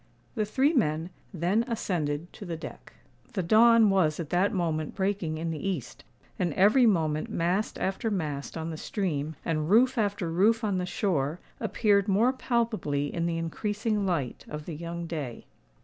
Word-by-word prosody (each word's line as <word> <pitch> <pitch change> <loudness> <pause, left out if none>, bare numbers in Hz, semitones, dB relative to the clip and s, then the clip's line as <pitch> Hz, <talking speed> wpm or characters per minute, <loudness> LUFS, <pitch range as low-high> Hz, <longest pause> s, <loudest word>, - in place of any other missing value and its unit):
The 215 -3 0
three 270 +8 +2
men 165 - +1 0.2
then 185 +6 +1
ascended 170 - -2
to - - -10
the 170 -4 -4
deck. - - -10 0.4
The 190 -5 -1
dawn 225 +3 +6
was 170 -5 +2
at 160 -4 -5
that 185 +3 +3
moment 160 -5 -1
breaking 190 -5 -1
in 165 +1 -2
the 155 - -4
east; 185 -10 -4 0.4
and 175 -4 0
every 215 +6 +5
moment 155 -6 +1
mast 180 +5 0
after 195 +4 -1
mast 155 -8 -3
on 160 +1 -4
the 160 - -6
stream, 160 -6 -2
and 155 -1 -1
roof 250 +4 +4
after 200 -5 -1
roof 220 +7 +3
on 200 -3 0
the 180 - -2
shore, 165 -3 -1 0.2
appeared 205 -3 +2
more 220 +6 +3
palpably 220 - -1
in 170 0 -1
the 165 -1 -1
increasing 210 +5 -1
light 165 -10 -2
of 150 0 -6
the 170 - -5
young 170 +2 -5
day. 150 -8 -5
180 Hz, 170 wpm, -28 LUFS, 160-210 Hz, 0.4 s, dawn